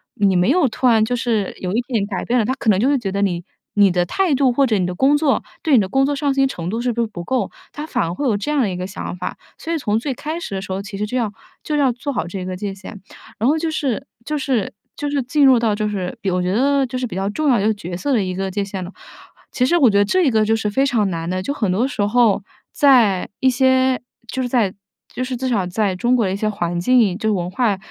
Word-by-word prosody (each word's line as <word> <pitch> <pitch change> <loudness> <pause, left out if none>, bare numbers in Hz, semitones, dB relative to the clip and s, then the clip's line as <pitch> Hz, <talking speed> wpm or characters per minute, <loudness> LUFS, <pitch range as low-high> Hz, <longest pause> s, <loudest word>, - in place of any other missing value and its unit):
你 200 -2 +2
没 180 +4 +3
有 320 0 +4
突 250 +2 -3
然 225 -3 +5
就 245 - -1
是 230 -5 -1
有 180 - -2
一 220 - +1
点 225 -6 0
改 195 -3 -4
变 245 - +1
了， 235 - +3
他 255 - 0
可 225 - -1
能 200 - +5
就 240 +8 +2
会 285 - +3
觉 225 -6 -3
得 200 - -1
你 175 -3 -1 0.3
你 205 -1 +6
的 175 0 +1
态 345 - +1
度， 265 -1 +3
或 270 +2 +2
者 220 -3 +2
你 185 - 0
的 180 - -3
工 270 +9 +4
作 290 -2 +2 0.2
对 315 - +2
你 - - +7
的 195 - 0
工 270 +7 +2
作 290 - 0
上 285 0 0
心 270 0 +3
程 175 -10 -4
度 225 +4 -2
是 245 - 0
不 235 - -5
是 230 - 0
不 180 -5 -8
够？ 255 +7 -1 0.2
他 295 - -6
反 - - 0
而 165 0 -2
会 285 +9 -2
有 225 - +2
这 205 +9 -3
样 300 - +1
的 220 - +1
一 185 - -4
个 180 +1 -4
想 190 -1 -6
法， 180 0 -5 0.2
所 330 - -6
以 - - +1
从 215 -8 0
最 265 +4 -2
开 310 +6 -5
始 205 - -6
的 190 - -3
时 190 - -5
候， 195 - -3
其 200 0 -8
实 210 - -1
就 250 +5 -3
要 225 -4 0 0.3
就 300 - -1
要 270 -4 +3
做 255 +4 -4
好 245 - -2
这 185 +1 -5
个 185 0 -4
界 200 +1 -4
限。 195 +1 -10 0.4
然 230 +5 +2
后 310 - +3
就 320 0 -2
是 275 -4 -2 0.2
就 305 +2 -2
是 260 -7 -1 0.2
就 290 -2 -2
是 285 -2 0
进 280 +4 +2
入 260 -2 +7
到， 225 -2 +1
就 210 0 -1
是 190 -4 -4
比 195 - -1
我 180 0 0
觉 180 0 -1
得 275 +6 +2
就 255 0 -5
是 250 - -2
比 210 - -8
较 195 +1 -1
重 295 +8 0
要 250 - +4
的 215 +2 +2
角 180 -4 -7
色 280 +11 -2
的 240 -5 +3
一 185 -1 -3
个 190 0 -3
界 200 +1 -2
限 195 -1 -5
了。 180 - -8 0.6
其 250 - +2
实 345 +6 +3
我 275 -8 +5
觉 200 - +2
得 205 - +5
这 365 - +2
一 295 - +4
个 220 -1 +3
就 220 +1 +2
是 215 -1 -1
非 265 +7 +1
常 225 -7 +1
难 165 -1 -4
的， 185 0 -1
就 240 +10 -2
很 210 -9 -1
多 220 +8 +1
时 275 - -4
候， 210 0 +3 0.3
在 235 -10 +4
一 260 - +4
些 260 0 +2 0.3
就 260 +3 -3
是 250 - -2
在 225 -7 +1 0.4
就 255 - -3
是 255 -1 -3
至 260 +2 -2
少 215 -7 +1
在 190 +1 -1
中 240 +7 +1
国 235 -4 +2
的 190 - -1
一 - - -1
些 215 +2 -1
环 175 -5 -2
境， 215 -2 +3
就 220 0 -1
是 - - +2
文 175 -3 -2
化 205 +1 +1
225 Hz, 325 characters per minute, -20 LUFS, 195-265 Hz, 0.6 s, 你